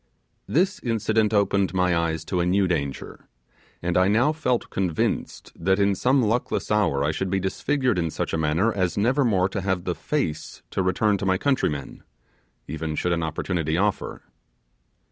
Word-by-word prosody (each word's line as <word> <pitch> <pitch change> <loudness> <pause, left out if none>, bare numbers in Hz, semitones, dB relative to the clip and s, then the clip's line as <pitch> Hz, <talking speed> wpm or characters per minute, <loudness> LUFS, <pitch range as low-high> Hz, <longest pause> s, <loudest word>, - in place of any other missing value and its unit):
This 185 +5 +1
incident 110 -2 +1
opened 100 -2 +1
my 90 -1 +2
eyes 80 -1 -1
to 90 - -1
a 85 - +2
new 95 +1 +3
danger; 70 -6 -4 0.6
and 85 0 -1
I 95 +1 +4
now 115 +9 +3
felt 125 -6 -1
convinced 90 -5 -2
that 95 +3 +1
in 100 0 +3
some 130 +6 +2
luckless 115 +1 -1
hour 100 -10 +2
I 75 - +1
should 95 +4 -3
be 95 +1 +1
disfigured 125 +3 0
in 85 -1 0
such - - -3
a - - +1
manner 80 +9 +1
as 95 -2 -1
never 125 +7 +2
more 95 -6 +2
to 95 +1 -3
have 95 -2 -1
the 90 - -1
FACE 85 - -3
to - - 0
return 100 +2 +1
to 100 - -3
my 95 0 +3
countrymen, 95 - -1 0.7
even 80 +1 -4
should 90 +3 0
an 85 - -1
opportunity 80 0 -1
offer. 100 +2 -1
95 Hz, 175 wpm, -24 LUFS, 85-110 Hz, 0.7 s, I